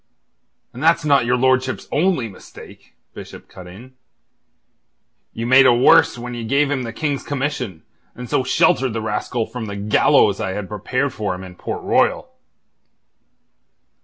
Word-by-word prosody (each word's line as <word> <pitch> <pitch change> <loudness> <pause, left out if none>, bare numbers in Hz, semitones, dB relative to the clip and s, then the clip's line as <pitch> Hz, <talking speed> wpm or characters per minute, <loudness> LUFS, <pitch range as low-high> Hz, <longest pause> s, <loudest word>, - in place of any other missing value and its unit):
"And 125 - -9
that's 165 0 +2
not 140 -5 +3
your 125 +1 +2
lordship's 130 0 0
only 155 -6 +1
mistake," 95 - -15 0.2
Bishop - - -11
cut 90 -2 -13
in. 115 +9 -13 1.4
"You 115 - -5
made 130 +2 +6
a 125 - +6
worse 125 0 +4
when 120 +1 -7
you 120 -1 -6
gave 140 +5 +1
him 140 -2 -1
the 115 -2 -5
King's 145 +2 -3
commission, 130 - -4 0.3
and 125 0 -8
so 130 - 0
sheltered 130 -1 +2
the 115 - -3
rascal 110 +2 -2
from 125 -1 -7
the 100 -1 -6
gallows 100 +1 +2
I 95 - -3
had 105 -1 -5
prepared 125 +7 -2
for 105 -4 -3
him 90 - -9
in 95 -1 -10
Port - - -6
Royal." - - 0
125 Hz, 160 wpm, -19 LUFS, 105-135 Hz, 1.4 s, made